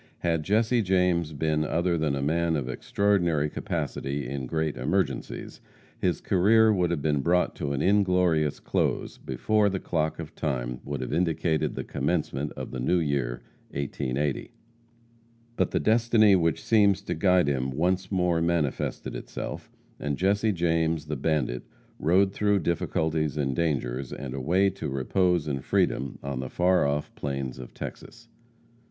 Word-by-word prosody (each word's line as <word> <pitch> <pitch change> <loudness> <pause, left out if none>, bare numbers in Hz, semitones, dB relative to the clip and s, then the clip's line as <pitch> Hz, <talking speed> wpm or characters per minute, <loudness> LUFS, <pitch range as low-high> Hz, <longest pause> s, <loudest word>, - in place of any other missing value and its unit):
Had 80 -2 +1
Jesse 115 +7 +2
James 90 -4 +2
been 75 +1 0
other 85 +3 0
than 80 -3 0
a 70 - -2
man 85 +2 +1
of 70 -4 -2
extraordinary 85 -1 +1
capacity 70 -1 -3
in 65 -1 -4
great 80 +1 -1
emergencies, - - -2 0.4
his 90 -4 0
career 110 +4 +4
would 90 -3 +1
have 85 -5 -2
been 75 -2 +2
brought 90 +4 +2
to 70 - -2
an 70 - -1
inglorious 90 -6 +2
close - - -1
before 105 - +1
the 95 -1 -2
clock 80 -3 -1
of 80 -1 -7
Time 60 -5 -3
would 70 -2 -4
have 65 - -4
indicated 80 -1 0
the - - -3
commencement 75 -1 -2
of - - -7
the 65 - -5
New 65 +9 +2
Year, 70 -7 -1 0.3
1880. 70 0 -2 1.1
But - - +1
the - - 0
destiny 110 -2 +4
which 85 +1 +1
seems 100 -4 +3
to - - -2
guide 90 -5 +3
him 65 -2 0
once 90 +9 0
more 90 -3 +1
manifested 85 -4 -1
itself, - - -6 0.3
and 70 -1 -2
Jesse 100 +4 +2
James, 80 -3 0
the 75 0 -3
bandit, 65 -4 0 0.4
rode 95 +4 +3
through 105 -2 +2
difficulties 80 -2 -1
and 70 -3 0
dangers, 65 -5 -1
and 65 -2 -6
away 90 +9 +2
to 95 - -5
repose 85 +5 +1
and 70 -2 -2
freedom 65 +1 0
on 70 -2 -3
the 65 -1 -4
far 90 -3 +3
off 75 +1 -2
plains 70 -2 -4
of 60 - -10
Texas. 115 0 -9
80 Hz, 155 wpm, -27 LUFS, 70-90 Hz, 1.1 s, career